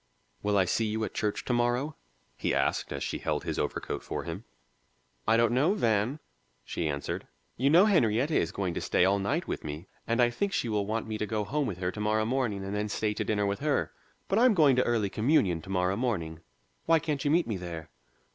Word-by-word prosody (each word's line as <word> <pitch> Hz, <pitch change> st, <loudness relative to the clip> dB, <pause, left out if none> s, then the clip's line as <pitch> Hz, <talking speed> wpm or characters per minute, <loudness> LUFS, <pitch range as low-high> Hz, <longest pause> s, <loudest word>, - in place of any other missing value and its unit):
"Will 105 Hz, 0 st, +1 dB
I 95 Hz, -, +4 dB
see 110 Hz, +5 st, +1 dB
you 110 Hz, +1 st, -2 dB
at 105 Hz, -, -3 dB
church 105 Hz, -1 st, -2 dB
to 125 Hz, -, 0 dB
morrow?" 120 Hz, +5 st, +1 dB, 0.4 s
he -, -, -1 dB
asked, -, -, 0 dB
as -, -, -3 dB
she -, -, -3 dB
held -, -, -2 dB
his -, -, -3 dB
overcoat -, -, -3 dB
for -, -, -4 dB
him. 85 Hz, +7 st, -6 dB, 0.8 s
"I 110 Hz, +1 st, +5 dB
don't 115 Hz, -1 st, +3 dB
know, 145 Hz, +11 st, +3 dB
Van," 115 Hz, -, +1 dB, 0.5 s
she 80 Hz, -, -2 dB
answered. 70 Hz, -1 st, -3 dB, 0.3 s
"You 135 Hz, +3 st, +2 dB
know 175 Hz, +6 st, +7 dB
Henrietta 135 Hz, -, +2 dB
is 85 Hz, -, +1 dB
going 95 Hz, -3 st, -2 dB
to -, -, -3 dB
stay 90 Hz, -, +2 dB
all 100 Hz, +1 st, +3 dB
night 145 Hz, -, -1 dB
with -, -, -4 dB
me, 75 Hz, +3 st, -6 dB, 0.2 s
and 115 Hz, +1 st, 0 dB
I 120 Hz, -1 st, +4 dB
think 195 Hz, +11 st, -2 dB
she 120 Hz, -, 0 dB
will 105 Hz, -2 st, 0 dB
want 110 Hz, +1 st, -1 dB
me 110 Hz, -1 st, -4 dB
to 105 Hz, -, -1 dB
go 105 Hz, -1 st, -1 dB
home 140 Hz, +6 st, -1 dB
with 95 Hz, -, -4 dB
her 90 Hz, 0 st, -1 dB
to 105 Hz, -, -9 dB
morrow 110 Hz, +1 st, +1 dB
morning 115 Hz, -5 st, -1 dB
and 100 Hz, -, -4 dB
then 105 Hz, 0 st, -1 dB
stay 105 Hz, 0 st, -1 dB
to -, -, -2 dB
dinner 105 Hz, -1 st, 0 dB
with 100 Hz, 0 st, -1 dB
her. 145 Hz, 0 st, 0 dB, 0.4 s
But 200 Hz, -, +2 dB
I'm 245 Hz, -2 st, +5 dB
going 150 Hz, -6 st, +5 dB
to 125 Hz, -, +4 dB
early 110 Hz, -5 st, +1 dB
communion 105 Hz, -, +2 dB
to 95 Hz, -, -12 dB
morrow 90 Hz, 0 st, +1 dB
morning; 90 Hz, -10 st, -2 dB, 0.5 s
why 165 Hz, 0 st, +6 dB
can't 150 Hz, -3 st, -2 dB
you 145 Hz, -, +1 dB
meet 170 Hz, +3 st, +3 dB
me 110 Hz, -4 st, -3 dB
there?" 85 Hz, -3 st, -7 dB
110 Hz, 230 wpm, -29 LUFS, 100-135 Hz, 0.8 s, know